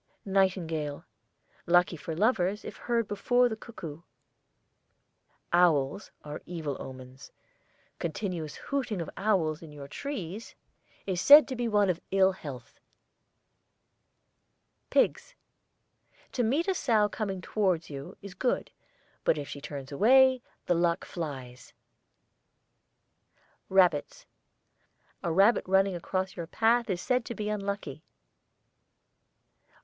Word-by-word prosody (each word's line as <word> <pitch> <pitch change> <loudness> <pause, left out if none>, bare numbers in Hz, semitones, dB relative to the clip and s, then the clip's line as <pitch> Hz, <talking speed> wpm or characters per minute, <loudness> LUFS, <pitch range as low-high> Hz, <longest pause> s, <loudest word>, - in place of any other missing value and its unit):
NIGHTINGALE. 175 -7 0 0.6
Lucky 175 0 +4
for 160 +1 -6
lovers 205 0 +1
if - - -7
heard 235 -2 -1
before 245 +5 +2
the 225 - -3
cuckoo. 170 -9 -9 1.5
OWLS 170 0 +3
are 150 0 -7
evil 160 -5 -4
omens. 130 0 -10 0.7
Continuous 170 -3 -4
hooting 260 -8 -3
of 165 - -5
owls 185 -7 0
in 160 -2 -11
your 145 -2 -9
trees 220 - -6 0.5
is 185 -2 -1
said 290 -1 +9
to 260 - -4
be 240 -1 -1
one 205 -2 +3
of 180 -2 -1
ill 190 0 +4
health. 140 -10 -10 2.1
PIGS. - - +1 1.0
To 255 - -1
meet 275 - +1
a 385 - +2
sow 225 - +2
coming 200 -2 -4
towards 185 -5 -1
you 140 +6 -8
is 200 -2 -8
good; 250 +6 -1 0.5
but - - +2
if 145 -1 -5
she 145 - -8
turns 140 -2 -7
away, 260 - +5 0.2
the 175 - +2
luck 170 0 +1
flies. 130 -7 -7 2.0
RABBITS. 180 -6 +2 1.0
A 170 - -1
rabbit 195 +7 +4
running 195 +1 +3
across 185 +2 -3
your 170 -2 -5
path 230 +4 +2
is 180 -2 -1
said 250 +4 +1
to 235 - -5
be 210 -1 -3
unlucky. 200 -8 -4
185 Hz, 115 wpm, -29 LUFS, 160-215 Hz, 2.1 s, said